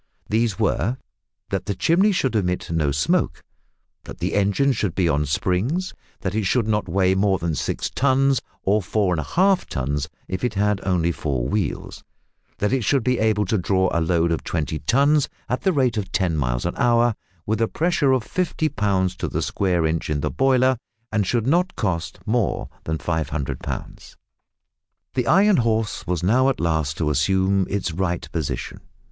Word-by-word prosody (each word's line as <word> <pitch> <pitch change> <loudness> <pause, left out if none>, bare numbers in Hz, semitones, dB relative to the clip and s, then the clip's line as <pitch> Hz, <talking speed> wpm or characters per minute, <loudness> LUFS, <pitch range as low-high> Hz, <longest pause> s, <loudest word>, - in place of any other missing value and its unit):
These 110 -3 +1
were 120 +8 0 0.5
That 95 -1 -2
the 100 - -1
chimney 185 - +3
should 130 - 0
emit 90 -5 -1
no 80 -3 +1
smoke 70 +2 0 0.6
that - - -9
the 90 +2 -2
engine 100 +8 +2
should 100 -9 -2
be 90 -3 +2
on 75 -1 +1
springs 115 - -1 0.3
that 95 - -2
it 110 -1 0
should 115 +3 +1
not 105 -3 0
weigh 95 +1 +2
more 95 0 +2
than 85 -2 -2
six 70 - -2
tons, 135 -1 +2 0.2
or 105 +2 +2
four 95 0 0
and 85 - -1
a - - -2
half 190 - +2
tons 70 +3 -2 0.2
if 95 0 -4
it 125 -3 -1
had 105 0 +1
only 90 -3 +1
four 65 -7 -2
wheels 105 -2 -3 0.5
that 105 +5 0
it 130 -3 +1
should 130 +4 +2
be 125 0 +1
able 110 -1 +2
to 105 +2 0
draw 95 +1 +1
a 85 - +1
load 85 0 +1
of 80 - -1
twenty 80 -1 -2
tons 140 - +3 0.2
at 125 - -1
the 190 - +2
rate 130 -8 +1
of 95 -3 -3
ten 90 -4 +1
miles - - -1
an - - -1
hour, 120 0 +3 0.3
with 110 +1 -1
a 115 - +3
pressure 160 -3 +1
of 130 -3 +2
fifty 160 -1 -1
pounds 100 -4 0
to - - -2
the - - -2
square 90 -4 0
inch 80 +1 -1
in 75 -1 -1
the - - -1
boiler, 130 -1 +3 0.3
and 105 -3 0
should 115 +1 0
not 175 +7 +1
cost 85 -6 -2
more 110 -2 0 0.2
than 80 +1 -1
500 80 -5 -2
pounds. - - -7 1.0
The 125 -2 -1
Iron 200 +2 +5
Horse 110 -5 0
was 90 -1 -1
now 130 +8 +4
at 135 - -2
last 80 -3 0
about 80 - +1
to 75 - +1
assume 95 +6 +2
its 100 -3 -1
right 90 +1 -2
position. 80 -4 -4
100 Hz, 190 wpm, -22 LUFS, 85-125 Hz, 1.0 s, Iron